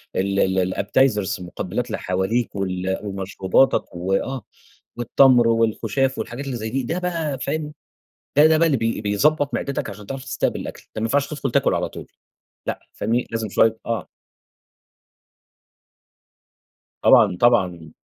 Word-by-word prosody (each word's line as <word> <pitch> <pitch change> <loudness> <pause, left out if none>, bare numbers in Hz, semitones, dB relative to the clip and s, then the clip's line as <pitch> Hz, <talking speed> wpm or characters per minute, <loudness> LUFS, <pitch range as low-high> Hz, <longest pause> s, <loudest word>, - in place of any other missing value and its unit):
ال 100 +1 0 0.2
ال 95 0 0
Appetizers 105 -2 +1
المُقبلات 90 +6 -4
اللي 110 - -3
حواليك، 95 +6 -1
وال 95 -1 -2
ومشروباتك 95 +4 +1
و 90 +2 -2
آه، 130 +6 -1 0.5
والتّمر 120 0 +4
والخُشاف 115 +3 +1
والحاجات 125 +4 -5
اللي 135 -3 -3
زي 110 0 -4
دي، 135 +3 -1
ده 165 +9 -2
بقى 165 -6 -2
فاهم 155 -1 -3 0.6
ده، 150 - +8
ده 160 0 +4
بقى 165 0 +3
بي 115 -1 -1
بيضَبط 145 +8 +1
معدِتك 140 -5 -2
عشان 100 +1 -10
تعرف 135 +4 -6
تستقبل 135 - -1
الأكل، - - -8
ده 110 - -3
مينفعش 140 +5 +1
تدخل 140 -4 -3
تاكل - - +2
على - - -1
طول، - - -10 0.6
لأ، - - -2
فاهمني، 120 +2 -1
لازم 115 -2 -2
شوية 110 +3 +3
آه. 115 -1 -2 3.0
طبعًا، 100 -5 +6
طبعًا، 90 -9 +2
115 Hz, 140 wpm, -22 LUFS, 100-135 Hz, 3.0 s, ده